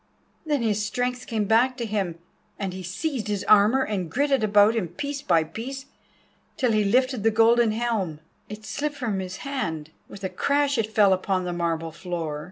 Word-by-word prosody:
Then 290 -5 +1
his 210 -2 0
strength 245 +3 -2
came 220 -3 -1
back 245 +5 +3
to 235 - -3
him, 195 -6 -2 0.4
and 195 -2 -3
he 185 - -6
seized 220 - -3
his 205 -2 -2
armour 215 +6 +5
and 190 -7 -3
girt 285 - 0
it 270 -5 +2
about 205 +1 +5
him 210 -6 -1
piece 280 - -5
by 170 - +3
piece 260 - -7 0.7
till 250 -3 +2
he 215 -1 +2
lifted 255 +3 +2
the 225 - +4
golden 225 +1 +4
helm. 215 -9 -2 0.3
It 210 +1 -9
slipped 295 +4 -3
from 225 -8 -2
his 185 0 -5
hand; 160 - -3 0.2
with 200 - -12
a 190 - -1
crash 280 +7 +1
it 220 -1 -1
fell 205 -3 +5
upon 185 0 -1
the 180 -1 -3
marble 165 -1 -2
floor. 165 -3 -4
215 Hz, 190 wpm, -25 LUFS, 185-250 Hz, 0.7 s, armour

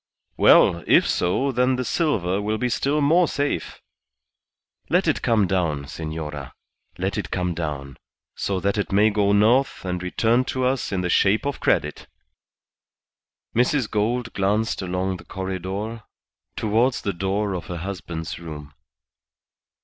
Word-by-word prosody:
"Well, 85 -1 +5
if - - +5
so, 130 +10 +1
then 125 +1 +2
the 125 0 -2
silver 100 - 0
will 105 +1 -1
be 125 +3 -1
still 145 +5 0
more 165 +5 +4
safe. 145 - -3 1.1
Let - - +2
it - - +1
come 110 -4 +3
down, 85 -6 -1
senora. 75 -2 -6 0.4
Let - - -2
it - - -5
come 90 -1 -1
down, 75 -4 -5 0.4
so 95 -2 -2
that 100 +2 0
it 100 - -2
may 105 +3 +4
go 100 -1 +2
north 115 +5 +3
and 90 -1 -2
return 115 +7 +1
to 130 0 -1
us 130 -2 0
in 95 -2 -1
the 90 - -2
shape 100 +6 +3
of 140 -2 -2
credit." - - 0 1.5
Mrs. 125 +1 +2
Gould 115 +3 -1
glanced 105 +3 0
along 95 +1 -2
the - - -13
corredor 95 +4 -4 0.5
towards 115 +4 +1
the 100 - -1
door 95 +3 -1
of 85 -4 -5
her 90 - -5
husband's 85 -3 -5
room. 75 -3 -9
100 Hz, 145 wpm, -23 LUFS, 90-120 Hz, 1.5 s, Well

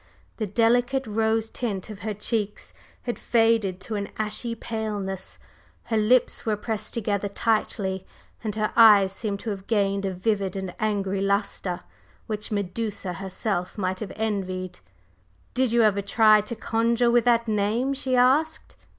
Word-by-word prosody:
The 215 - -2
delicate 245 +5 +2
rose 220 +1 +1
tint 215 -4 -3
of 205 - -9
her 210 +2 -4
cheeks 210 0 -3 0.3
had 240 - -3
faded 225 -5 +2
to 225 - -5
an 200 -1 -3
ashy 215 +2 -2
paleness, 210 -5 -4 0.5
her 225 - -1
lips 230 +4 +3
were 220 -2 +1
pressed 215 0 -4
together 205 -3 -1
tightly 200 -3 -1 0.4
and 215 -2 -2
her 215 -1 -1
eyes 205 -4 +7
seemed 200 -1 -3
to 225 - -3
have 195 -1 -7
gained 200 -3 +1
a - - -1
vivid 195 -1 -1
and 190 -2 -4
angry 200 -2 0
lustre 200 -2 -1 0.4
which 210 -1 -4
Medusa 205 -1 -3
herself 190 0 -3
might 185 -2 -1
have 215 - -5
envied. 185 -4 -3 0.7
"Did 255 -2 +1
you 235 0 +4
ever 205 -2 +3
try 215 +1 +5
to 210 +3 -6
conjure 230 +2 +1
with 240 -1 +3
that 235 -1 +3
name?" 220 +5 +1
she 265 -2 0
asked. 285 +6 +2
215 Hz, 150 wpm, -25 LUFS, 195-230 Hz, 0.7 s, eyes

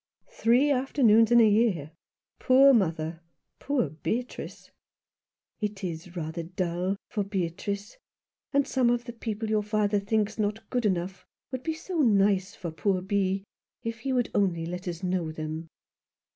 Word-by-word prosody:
"Three 260 - +3
afternoons 250 -5 +4
in 240 - +7
a 225 - +7
year? 205 -9 +2 0.5
Poor 270 +2 +6
mother! 165 -6 0 0.4
Poor 275 - 0
Beatrice! 230 +10 -5 0.4
" - - -62
"It 210 -2 -3
is 175 0 -5
rather 165 0 -4
dull 180 +2 -2
— - - -66
for 205 - 0
Beatrice. 200 - -4 0.5
And 280 -1 +3
some 255 -3 +2
of 240 0 +1
the 235 - -7
people 225 -1 -4
your 215 -1 +3
father 210 -1 +1
thinks 215 +1 -1
not 215 +1 -2
good 245 -3 +1
enough 185 0 -2 0.3
would 260 -1 -4
be 320 +3 -2
so 340 +2 -4
nice 200 -6 +3
for 170 -3 -5
poor 185 +3 0
Bee, 195 0 0 0.4
if 230 0 -4
he 265 +4 -3
would 250 -2 0
only 175 -5 +1
let 180 +3 -6
us 170 0 -5
know 180 -3 -1
them." 155 +1 -5
205 Hz, 160 wpm, -27 LUFS, 180-235 Hz, 0.5 s, in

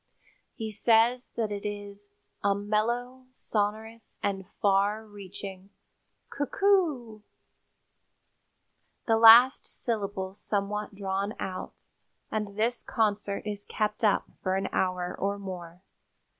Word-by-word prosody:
He 220 -2 -4
says 230 +3 +3
that 220 -3 -1
it 200 -1 -4
is 205 0 -6 0.3
"a 200 -1 +3
mellow, 235 +5 -1
sonorous 220 -1 -3
and 195 -2 -2
far 205 +2 +2
reaching 195 -2 -9 0.6
'coo 285 0 -2
c - - -29
oo,' 280 - +2 1.8
the 225 -1 +3
last 230 +3 +8
syllables 200 -4 -3
somewhat 210 0 -2
drawn 195 +1 -2
out, 185 -1 -6 0.5
and 210 -2 -3
this 235 +3 +1
concert 210 -4 -1
is 205 -1 -4
kept 210 0 -2
up 210 -2 +3 0.2
for 185 -1 0
an 195 0 -1
hour 180 -1 -1
or 200 +1 -1
more. 180 -2 -8
210 Hz, 115 wpm, -28 LUFS, 200-225 Hz, 1.8 s, last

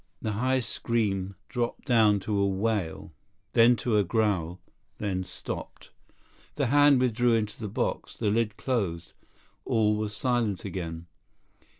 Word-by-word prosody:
The 110 - -2
high 130 +5 +1
scream 100 -5 -1
dropped 120 -1 -3
down 110 -6 +4
to 105 +2 -2
a 100 0 +2
wail, 95 -5 -2 0.4
then 120 +1 +6
to 110 0 0
a 105 - +4
growl, 95 -4 0 0.4
then 95 -3 -2
stopped. - - -8 0.6
The 140 - 0
hand 145 -2 +6
withdrew 120 -1 +2
into 110 -1 -2
the 110 - -4
box. 100 - -3
The 105 - 0
lid 110 -1 0
closed. 95 -10 -2 0.5
All 105 -2 +2
was 105 0 -3
silent 120 -7 0
again. 85 -3 -5
105 Hz, 135 wpm, -27 LUFS, 100-120 Hz, 0.6 s, then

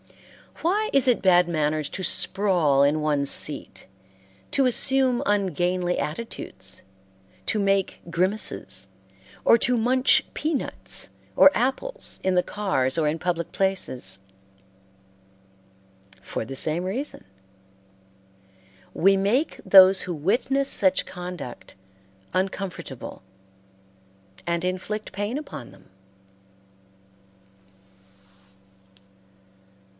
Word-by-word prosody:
Why 415 +6 +1
is 275 -2 +4
it 245 - +3
bad 180 -2 +4
manners 155 -2 -1
to 190 - -6
sprawl 170 -7 +3
in 150 +2 +2
one's 145 -2 +2
seat, - - -1 0.6
to 275 - +2
assume 255 0 +3
ungainly 180 -2 0
attitudes, 100 - -6 0.7
to - - +1
make 195 -1 0
grimaces, 170 - -1 0.6
or 230 - +6
to 245 +2 +1
munch 255 +3 +3
peanuts 305 -3 -4 0.3
or 285 - +7
apples 270 - -2
in 190 -1 +1
the 180 - +3
cars 170 -11 -1
or 155 -2 +1
in 150 +2 -1
public 170 0 -3
places? 130 - 0 2.0
For - - -5
the 135 - -7
same 155 +5 0
reason. 245 +11 -5 1.7
We 195 +2 +3
make 220 +11 0
those 190 0 +7
who 180 - -4
witness 255 - 0
such 190 -1 +4
conduct 175 - -8 0.6
uncomfortable, 185 - -4 1.2
and 170 0 -1
inflict 185 +4 -4
pain 205 +6 -3
upon 275 - -8
them. 95 -1 -20
185 Hz, 95 wpm, -24 LUFS, 155-225 Hz, 2.0 s, or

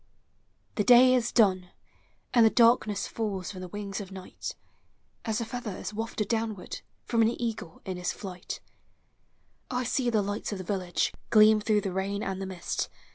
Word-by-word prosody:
The 210 - +3
day 250 +4 +7
is 245 -2 +1
done, 185 -5 +3 0.6
and 240 -2 +6
the 220 - +7
darkness 230 -3 +4
Falls 200 -5 -3
from 185 -2 -8
the 185 - -6
wings 200 +1 -5
of 195 -1 -9
Night, 190 -1 -7 0.7
As 220 0 0
a 230 - -2
feather 225 -4 -5
is - - -6
wafted 220 -1 -3
downward 220 -5 -3 0.2
From 230 -1 +2
an 225 +1 +2
eagle 225 -8 -4
in 185 -1 -4
li - - -7
is 180 - 0
tiight. 180 -3 -7 1.1
1 250 0 -1
see 245 +1 +1
the 215 -3 +2
lights 205 +2 -3
of 205 - -3
the 185 - -6
village 185 -2 -1 0.2
(tleam 215 0 +6
through 210 0 +2
the 195 -2 -3
rain 195 +2 -2
and 195 0 -3
the 190 - -3
mist. 185 -2 -3
210 Hz, 185 wpm, -28 LUFS, 190-230 Hz, 1.1 s, day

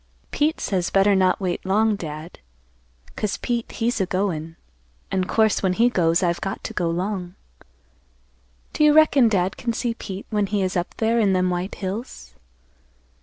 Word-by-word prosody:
"Pete 305 +2 0
says 180 -3 -1
better 195 +1 +4
not 185 -1 +2
wait 180 -3 -2
long, 210 +3 +2
Dad; 160 -2 -8 0.8
'cause 210 -2 -2
Pete 235 -1 -3
he's 230 -1 -1
a 190 - 0
goin' 170 -4 -2 0.6
an' 185 -1 0
course 220 +2 +2
when 190 -2 +1
he 235 +5 +3
goes 170 -4 +2
I've 170 -1 0
got 195 - -4
to - - -5
go 175 -2 -1
'long. 180 +1 -3 1.4
Do - - +1
you 300 -1 +6
reckon 295 -6 +5
Dad 190 -3 0
can 235 -2 -2
see 235 +1 -1
Pete 195 -3 -7
when 210 -2 +1
he 205 -1 0
is 185 +1 -2
up 175 0 -2
there 230 +1 +1
in 200 -4 +3
them 185 0 +1
white 180 +2 -3
hills? 190 - -6
195 Hz, 170 wpm, -23 LUFS, 180-220 Hz, 1.4 s, you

